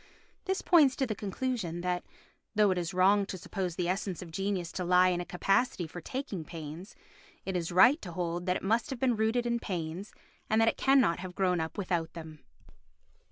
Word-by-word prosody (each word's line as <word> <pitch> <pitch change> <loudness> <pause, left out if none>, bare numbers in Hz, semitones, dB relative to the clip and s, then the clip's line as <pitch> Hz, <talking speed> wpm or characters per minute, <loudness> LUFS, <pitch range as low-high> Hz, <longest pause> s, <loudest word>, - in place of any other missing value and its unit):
This 380 0 -1
points 300 -7 +5
to 265 - 0
the 225 - -2
conclusion 205 -4 -3
that, 180 0 -1 0.5
though 210 -2 +4
it 185 - 0
is 170 -1 -3
wrong 195 +2 +4
to 190 - -5
suppose 180 -1 -4
the 175 -1 -1
essence 185 0 -2
of 170 - -11
genius 195 -1 -2
to 185 - -4
lie 180 +1 +5
in 175 -1 0
a - - -5
capacity 195 +2 +1
for 175 +2 -8
taking 215 - -5
pains, 165 +3 -8 0.5
it 190 - -3
is 170 -1 -2
right 215 - +6
to 175 - -7
hold 175 +1 -3
that 180 - +2
it - - -11
must 225 +8 +1
have 265 - -4
been 250 -2 +2
rooted 220 +3 +1
in 235 0 0
pains 180 -1 -5 0.4
and 220 - +3
that 225 - +4
it - - -2
cannot 265 -11 +3
have 180 0 -7
grown 180 -2 +1
up 160 +4 -4
without 175 -4 -2
them. 160 -2 -9
185 Hz, 205 wpm, -30 LUFS, 175-220 Hz, 0.5 s, right